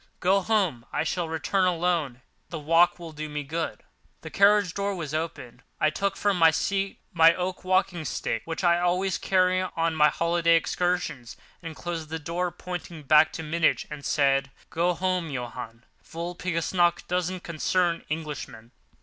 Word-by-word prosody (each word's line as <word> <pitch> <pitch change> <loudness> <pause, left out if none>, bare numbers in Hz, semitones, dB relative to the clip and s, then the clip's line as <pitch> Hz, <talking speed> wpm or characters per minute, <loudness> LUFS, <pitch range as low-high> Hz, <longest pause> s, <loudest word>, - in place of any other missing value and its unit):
Go 190 +2 +3
home; 185 - 0
I 150 - 0
shall 165 +1 -2
return 160 +5 0
alone; 170 -7 0 0.3
the 170 - -5
walk 165 +3 +3
will 170 -2 -9
do 155 0 -6
me 150 0 -4
good." 160 +3 -4 0.4
The 160 - -9
carriage 200 -3 +4
door 200 0 -2
was 155 -5 -5
open. 145 -6 -5 0.2
I 155 - +3
took 200 +4 -2
from 200 -3 +1
the 165 -1 +7
seat 195 +4 -1 0.2
my 165 0 +6
oak 185 +1 -4
walking 185 -2 +1
stick—which 160 - -3
I 170 -1 +4
always 180 +2 0
carry 185 -1 +2
on 165 -3 -1
my 150 -1 +5
holiday 170 0 +2
excursions—and 165 -2 -3
closed 165 -3 -5
the 160 - -3
door, 170 +3 -2
pointing 175 -2 -7
back 155 +3 +5
to 160 - -5
Munich, 160 +1 +1
and 150 -1 -7
said, 135 -1 +2 0.2
"Go 175 +2 +1
home, 185 -2 -1
Johann—Walpurgis 155 +8 -5
nacht 175 -1 +2
doesn't 180 0 -1
concern 170 +1 0
Englishmen." 145 -7 -6
170 Hz, 155 wpm, -26 LUFS, 155-180 Hz, 0.4 s, the